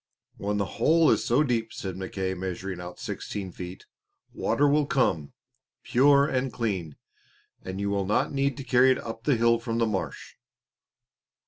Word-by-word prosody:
"When 105 +1 -2
the 100 - 0 0.2
hole 160 0 +5
is - - +2
so 125 +6 +3
deep," 115 -5 -1
said 95 -2 -5
Mackay, 95 0 -3
measuring 95 0 -5
out 90 0 -9
sixteen 95 -3 -5
feet, 90 +1 -8 0.5
"water 145 - +1
will 145 0 +3
come, 85 - 0 0.5
pure 140 +2 +5
and 130 -2 -1
clean, 95 - -3 0.7
and 95 +1 -6
you 100 0 -1
will 100 -1 -1
not 105 - +1
need 140 -1 0
to 140 - -6
carry 125 +1 +4
it 130 - +4
up 115 +1 -7
the 145 - +3
hill 115 0 +3
from 115 -1 -3
the 115 - +2
marsh." 105 -4 -4
115 Hz, 165 wpm, -27 LUFS, 95-130 Hz, 0.7 s, hole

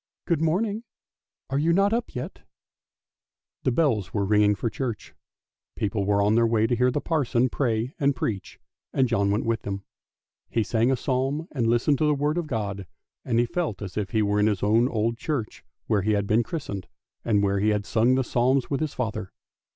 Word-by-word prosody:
Good 170 -4 +1
morning! 200 +7 0 0.7
Are 135 - +1
you 165 +3 +2
not 200 +4 +3
up 235 +1 -2
yet? 125 - -6 0.6
" - - -65
The 130 - +3
bells 120 - +1
were 100 -1 +1
ringing 105 0 +4
for 115 - -2
church; 115 -2 -4 0.6
people 100 -1 -1
were 100 0 +2
on 105 +1 +3
their 115 +1 +4
way 110 -1 +2
to 120 - +1
hear 125 +2 +3
the 130 - -1
parson 130 -6 +1
pray 120 0 -1
and 140 -1 +2
preach, 100 -6 -4 0.3
and 130 -1 +3
John 100 -4 +1
went 105 +2 0
with 115 -1 0
them. 100 -1 -5 0.7
He 115 - +1
sang 115 +4 +1
a 135 - +3
psalm 135 +5 -1
and 120 -6 0
listened 120 +5 +2
to 155 - +2
the 150 - +3
word 150 +4 0
of 170 - -4
God, 100 -7 -3 0.4
and 115 -2 0
he 120 - +4
felt 150 - -2
as 95 -3 -7
if 105 -3 -2
he 110 +3 +1
were 105 0 +1
in 105 - +4
his 105 -4 0
own 110 +4 +4
old 115 0 -1
church, 140 -9 -3 0.2
where 105 -2 +1
he 105 +3 +1
had 100 -1 +1
been 110 +3 +3
christened, 115 - -5 0.4
and 105 -3 +2
where 100 0 +1
he 105 +2 +2
had 105 -1 0
sung 120 +3 +3
the 130 - +2
psalms 130 +3 +1
with 140 - 0
his 155 -2 -3
father. 110 -6 -3
115 Hz, 210 wpm, -25 LUFS, 105-140 Hz, 0.7 s, ringing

